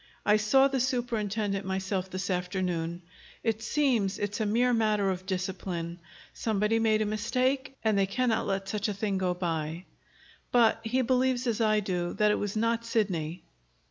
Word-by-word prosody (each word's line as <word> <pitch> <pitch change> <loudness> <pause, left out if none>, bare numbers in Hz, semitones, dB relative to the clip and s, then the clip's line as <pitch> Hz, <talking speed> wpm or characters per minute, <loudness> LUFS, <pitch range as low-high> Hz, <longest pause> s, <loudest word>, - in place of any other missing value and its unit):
I 210 0 +5
saw 265 +6 +4
the 270 -1 -1
superintendent 220 -5 -1
myself 190 0 -2
this 185 +1 -3
afternoon. 180 -2 -2 0.4
It 225 -1 0
seems 235 -6 +1
it's 205 +1 -3
a 215 - 0
mere 245 +4 +3
matter 210 -3 +2
of 185 0 -5
discipline. 180 -2 -3 0.3
Somebody 215 0 +1
made 215 -1 +3
a - - -2
mistake, 255 +6 -1
and 220 -2 +2
they 195 -1 +2
cannot 230 +2 0
let 195 0 -1
such 210 +1 -1
a 205 - -2
thing 200 -1 -1
go 180 -1 0
by. 165 -1 -3 0.7
But 235 -2 +4
he 250 +3 +1
believes, 255 0 +1
as 235 -2 0
I 215 -1 +3
do, 180 -3 -2
that 210 0 +3
it - - +1
was 205 0 -3
not 230 +1 +1
Sidney." 180 -8 -1
210 Hz, 170 wpm, -29 LUFS, 190-230 Hz, 0.7 s, I